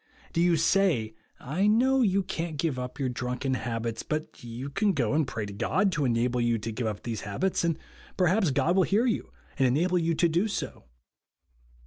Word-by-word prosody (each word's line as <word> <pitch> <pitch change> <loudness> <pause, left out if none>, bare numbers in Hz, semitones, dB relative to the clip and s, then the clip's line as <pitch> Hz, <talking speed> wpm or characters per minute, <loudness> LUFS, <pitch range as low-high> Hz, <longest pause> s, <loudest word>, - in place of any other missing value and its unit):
Do 165 - +1
you 175 -1 +4
say, 155 - +2 0.3
I 165 +10 0
know 260 +5 +4
you 200 -4 +2
can't 165 -3 -4
give 145 -4 -1
up 125 +4 -6
your 135 - 0
drunken 125 +2 -2
habits, 115 -1 -3
but 155 -4 -5
you 120 +4 -6
can 205 +6 +1
go 125 -6 0
and 150 -2 +2
pray 110 -5 -4
to 100 - -7
God 190 - +1
to 150 -5 0
enable 120 0 +1
you 120 -1 +2
to 115 +1 -5
give 115 +1 -2
up 105 -2 -4
these 115 -4 -4
habits, 170 - -1
and 165 -2 +1 0.4
perhaps 185 +1 +3
God 145 +6 +2
will 190 - +5
hear 205 +6 +2
you 235 - -1 0.3
and 135 - +5
enable 175 +8 +2
you 165 0 0
to 170 - +3
do 170 +6 +1
so. 200 - -5
150 Hz, 200 wpm, -28 LUFS, 120-180 Hz, 0.4 s, will